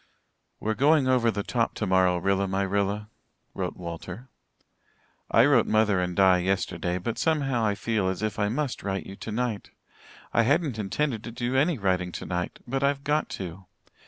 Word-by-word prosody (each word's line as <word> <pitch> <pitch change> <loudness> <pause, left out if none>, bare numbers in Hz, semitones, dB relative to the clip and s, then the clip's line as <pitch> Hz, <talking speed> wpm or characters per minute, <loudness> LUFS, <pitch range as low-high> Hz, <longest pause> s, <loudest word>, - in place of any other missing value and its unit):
"We're 110 - -1
going 140 +3 +3
over 125 -3 +3
the 100 -2 -2
top 115 +1 -1
tomorrow, 95 -3 +2
Rilla 95 +2 +1
my 95 +1 0
Rilla," 100 +2 -1 0.4
wrote - - -4
Walter. 90 +7 -7 1.0
"I 115 +3 +5
wrote 135 -6 +4
mother 110 -3 +3
and 90 -1 -2
Di 95 -1 +5
yesterday, 90 -2 -1
but 110 +5 -4
somehow 140 -7 +1
I 105 -2 +1
feel 105 -2 0
as 95 +3 -3
if 110 0 -2
I 105 -1 +2
must 135 +3 -2
write 95 -1 -3
you 95 - -8
tonight. 110 +1 -3 0.6
I - - +4
hadn't 140 -1 +1
intended 115 +3 -1
to 120 - -6
do 120 +2 -2
any 150 +4 +3
writing 90 -3 0
tonight 90 0 -4
but 135 +2 -2
I've 140 0 +1
got 150 +2 0
to. 95 0 -7
105 Hz, 170 wpm, -26 LUFS, 95-125 Hz, 1.0 s, I